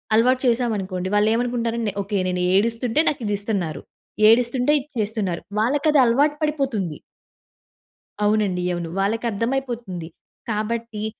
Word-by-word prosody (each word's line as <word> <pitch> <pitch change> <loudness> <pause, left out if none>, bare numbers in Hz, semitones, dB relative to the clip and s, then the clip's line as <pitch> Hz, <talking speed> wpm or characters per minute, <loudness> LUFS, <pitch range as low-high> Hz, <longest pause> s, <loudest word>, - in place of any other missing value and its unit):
అలవాటు 250 +3 +3
చేశామనుకోండి 205 -7 -1
వాళ్ళేమనుకుంటారంటే, 230 0 0
ఓకే. 200 +1 -2
నేను 180 0 -1
ఏడుస్తుంటే 230 +5 +1
నాకు 280 - -4
ఇది 205 - 0
ఇస్తున్నారు. 185 -8 -2 0.5
ఏడుస్తుంటే 245 +3 +3
ఇది 285 - -16
చేస్తున్నారు. 205 -5 -2 0.2
వాళ్ళకి 280 +8 +1
అది 295 - +4
అలవాటు 285 +6 +3
పడిపోతుంది. 265 - -1 1.3
అవునండి 205 -4 +1
అవును. 170 -1 -4
వాళ్ళకర్థమైపోతుంది. 230 -2 -2 0.4
కాబట్టి 215 0 -3
225 Hz, 105 wpm, -22 LUFS, 200-245 Hz, 1.3 s, అది